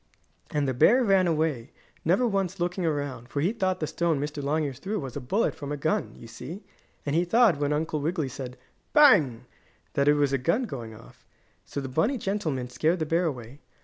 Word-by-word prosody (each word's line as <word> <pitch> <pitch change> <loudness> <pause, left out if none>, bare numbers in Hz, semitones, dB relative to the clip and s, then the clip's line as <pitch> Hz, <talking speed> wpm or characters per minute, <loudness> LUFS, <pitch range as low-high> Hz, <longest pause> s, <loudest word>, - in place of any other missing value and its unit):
And 145 -2 0
the 130 - 0
bear 245 - +5
ran 195 -4 +4
away, 155 -6 0 0.3
never 185 +10 +3
once 195 -3 -1
looking 175 +1 -1
around, 145 -6 -2
for 140 - -3
he 175 +9 +1
thought 185 -5 -1
the 155 - -1
stone 165 -1 0
Mr. 145 +1 -4
Longears 145 -2 -1
threw 205 +7 -3
was 135 -4 -6
a 145 - -4
bullet 195 - 0
from 145 -1 -7
a 145 - -2
gun, 160 +9 -1
you - - -12
see, 145 - -8 0.4
and 145 0 -1
he 170 - +3
thought 210 -3 +4
when 145 0 0
Uncle 155 0 -1
Wiggily 160 -1 -1
said 125 0 -7 0.4
"Bang!" 160 - +5 0.5
that 140 0 +1
it 145 - +6
was 145 -2 +1
a 135 - +2
gun 170 - +1
going 120 - -6
off. 115 - -16 0.4
So - - -5
the 135 - -4
bunny 160 - +1
gentleman 175 - -2
scared 155 +8 +1
the 160 - -1
bear 165 +3 +1
away. 130 -3 -5
155 Hz, 210 wpm, -27 LUFS, 135-185 Hz, 0.5 s, it